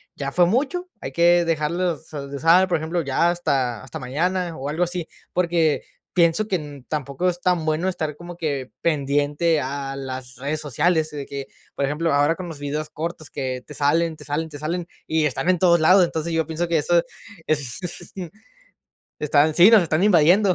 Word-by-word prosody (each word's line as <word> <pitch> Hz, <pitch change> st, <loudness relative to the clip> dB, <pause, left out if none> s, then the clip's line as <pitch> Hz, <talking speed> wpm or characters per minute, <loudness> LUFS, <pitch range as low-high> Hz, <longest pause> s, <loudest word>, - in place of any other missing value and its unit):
ya 140 Hz, -1 st, -4 dB
fue 175 Hz, +2 st, +4 dB
mucho, 290 Hz, -, 0 dB
hay 135 Hz, -, -5 dB
que 175 Hz, +4 st, +4 dB
dejarlos 165 Hz, +1 st, -1 dB
so 145 Hz, -3 st, -6 dB
de 140 Hz, -, -5 dB
usar, 175 Hz, +5 st, +5 dB
por 175 Hz, -, +2 dB
ejemplo, 165 Hz, +3 st, -2 dB
ya 165 Hz, +4 st, +2 dB
hasta 130 Hz, -9 st, -1 dB
hasta 135 Hz, -, -8 dB
mañana, 170 Hz, +6 st, -1 dB
o 135 Hz, +2 st, -5 dB
algo 160 Hz, +4 st, 0 dB
así". 175 Hz, -1 st, -5 dB, 0.2 s
Porque 170 Hz, -4 st, +1 dB, 0.3 s
pienso 170 Hz, +4 st, +3 dB
que 195 Hz, -, 0 dB
n 145 Hz, -5 st, -6 dB
tampoco 145 Hz, +3 st, -2 dB
es 175 Hz, 0 st, -1 dB
tan 180 Hz, -3 st, +1 dB
bueno 160 Hz, +4 st, 0 dB
estar 155 Hz, -5 st, -3 dB
como 175 Hz, +1 st, -10 dB
que 140 Hz, -6 st, -3 dB
pendiente 145 Hz, +1 st, +1 dB
a 135 Hz, +1 st, -4 dB
las 130 Hz, -1 st, -6 dB
redes 145 Hz, +4 st, -3 dB
sociales, 155 Hz, +3 st, +1 dB
de 145 Hz, -2 st, -6 dB
que, 140 Hz, -1 st, -6 dB, 0.3 s
por -, -, -1 dB
ejemplo, 150 Hz, +3 st, 0 dB
ahora 145 Hz, +3 st, +3 dB
con 185 Hz, 0 st, -7 dB
los 160 Hz, -4 st, -8 dB
videos 150 Hz, +2 st, -3 dB
cortos 160 Hz, 0 st, -6 dB
que 130 Hz, -2 st, -4 dB
te 150 Hz, -, -9 dB
salen, 160 Hz, +3 st, +1 dB
te 150 Hz, -, -13 dB
salen, 150 Hz, +3 st, -2 dB
te 150 Hz, -2 st, -9 dB
salen, 170 Hz, +4 st, -3 dB, 0.2 s
y 160 Hz, -1 st, +1 dB
están 150 Hz, +5 st, -1 dB
en 180 Hz, -2 st, +3 dB
todos 170 Hz, -2 st, +5 dB
lados. 185 Hz, +3 st, +6 dB
Entonces, 165 Hz, 0 st, -3 dB
yo 160 Hz, -1 st, +1 dB
pienso 165 Hz, +2 st, -3 dB
que 165 Hz, -, +2 dB
eso 170 Hz, +3 st, +3 dB, 0.5 s
es 140 Hz, -6 st, 0 dB
es 175 Hz, -1 st, -5 dB
n 175 Hz, -4 st, -6 dB, 0.9 s
están 150 Hz, +1 st, +3 dB
Sí, 180 Hz, +6 st, +8 dB
nos 220 Hz, -4 st, +8 dB
están 165 Hz, +2 st, +1 dB
invadiendo. 185 Hz, +1 st, +5 dB
160 Hz, 200 wpm, -23 LUFS, 145-175 Hz, 0.9 s, Sí